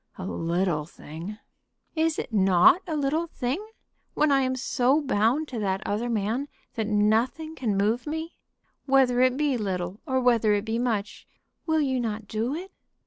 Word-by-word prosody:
"A 185 - -6
little 170 -3 -1
thing!" 170 +6 -8 0.6
"Is 320 0 +1
it 235 - -5
not 190 - +5
a 320 - -2
little 300 +3 0
thing, 275 +5 -3 0.5
when 305 -1 +3
I 275 -1 +4
am 260 0 0
so 260 +2 +2
bound 270 +2 +1
to 240 - -4
that 195 -1 -1
other 225 +4 -1
man 225 +5 -1 0.3
that 220 -2 -2
nothing 220 +9 +1
can 230 -10 -1
move 220 +7 +1
me? 320 +2 -4 0.5
Whether 260 -2 +4
it 255 0 +3
be 290 -3 +1
little 185 -1 -3
or 260 -1 +1
whether 230 -4 +3
it 205 +1 -2
be 225 +1 -1
much, 220 -4 -2 0.4
will 315 -1 +2
you 260 -3 0
not 215 -3 -3
do 225 +7 -2
it?" 370 +4 -7
240 Hz, 170 wpm, -26 LUFS, 205-275 Hz, 0.6 s, not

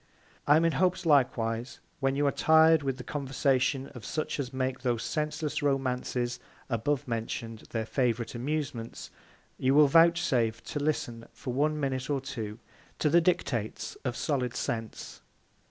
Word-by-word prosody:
I 145 - +7
am 160 +2 +4
in 165 - +3
hopes 180 +1 +1
likewise, 120 -5 +1 0.2
when 135 0 +1
you 145 +1 +1
are 140 - +3
tir'd 160 +1 +5
with 135 -2 -2
the 125 - -7
Conversation 135 -1 0
of 125 -5 -11
such 155 +7 -3
as 130 -3 -3
make 130 -1 -2
those 120 -3 0
senseless 155 0 -2
Romances 125 -3 -1 0.3
abovemention'd 115 -3 -2
their 110 -1 -2
favourite 120 -2 0
Amusements, 125 -2 -4 0.5
you 130 +1 +2
will 150 0 +7
vouchsafe 135 -8 +3
to 145 - -4
listen 120 -6 -2
for 125 - -5
one 150 +3 +1
Minute 135 -1 -2
or 140 -2 +1
two, 115 -5 -6 0.4
to 150 - +1
the 170 +2 +6
Dictates 140 - -1
of 125 -2 -2
solid 125 -5 -1
Sense. 115 -2 -4
135 Hz, 150 wpm, -29 LUFS, 120-150 Hz, 0.5 s, I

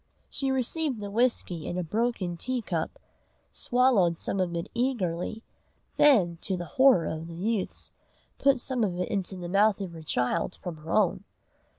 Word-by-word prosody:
She 270 - -1
received 265 0 0
the 205 -1 -6
whisky 215 -8 0
in 175 - -3
a 180 - -1
broken 210 -1 -1
tea 250 +7 -2
cup, 165 -5 -3 0.5
swallowed 240 -9 +3
some 195 - -2
of 175 -2 0
it 170 - -3
eagerly, 225 -4 -1 0.5
then, 200 - +5
to 190 - -2
the 175 - -5
horror 260 - +4
of 160 +1 -4
the 170 - -8
youths, 205 +3 -2 0.5
put 275 -2 +4
some 255 -1 -1
of 180 -4 -1
it 180 - -2
into 190 -1 -2
the 180 -1 -6
mouth 200 +3 +3
of 190 -3 -4
her 165 -1 -9
child 155 +4 -1
from 175 -3 -5
her 155 +2 -8
own. 200 -1 +2
195 Hz, 175 wpm, -28 LUFS, 170-240 Hz, 0.5 s, then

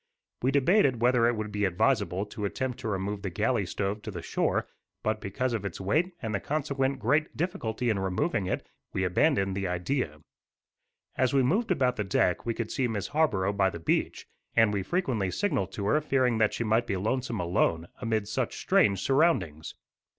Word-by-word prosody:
We 130 - +2
debated 140 - +3
whether 120 0 +4
it 120 - +1
would 110 -1 -4
be 105 0 -2
advisable 100 0 +1
to 105 0 -5
attempt 125 +4 -3
to - - -5
remove 100 0 -2
the 100 - -3
galley 105 +1 0
stove 100 +4 -2
to 110 - -7
the 90 -5 -6
shore; - - 0 0.4
but, 110 0 -1
because 120 +5 -2
of 110 -3 -2
its 100 -5 -5
weight 160 - 0
and 110 -1 -2
the 100 - 0
consequent 140 -1 -1
great 145 +8 0
difficulty 140 - -2
in 110 -4 +1
removing 95 - 0
it, - - -3 0.3
we 95 - 0
abandoned 95 - +2
the 100 -1 -1
idea. 90 - -2 1.0
As 130 +1 +2
we 135 - +4
moved 205 - +1
about 130 -9 +1
the 105 - 0
deck 95 +1 +1
we 115 - 0
could 115 -2 -3
see 130 -3 0
Miss 105 -4 -3
Harborough 100 -11 +1
by 100 -1 +2
the 85 - -7
beach, 80 - -1 0.3
and 110 -2 +4
we 100 - 0
frequently 120 - -1
signalled 100 - -1
to 100 - -4
her, 150 +9 +3
fearing 130 -5 +1
that 110 -1 +2
she - - -1
might 115 +2 +1
be 100 - -1
lonesome 120 +3 -1
alone, 85 -1 +1
amid 110 -3 -1
such - - -2
strange 100 -3 +3
surroundings. 135 - +1
110 Hz, 195 wpm, -28 LUFS, 100-130 Hz, 1.0 s, whether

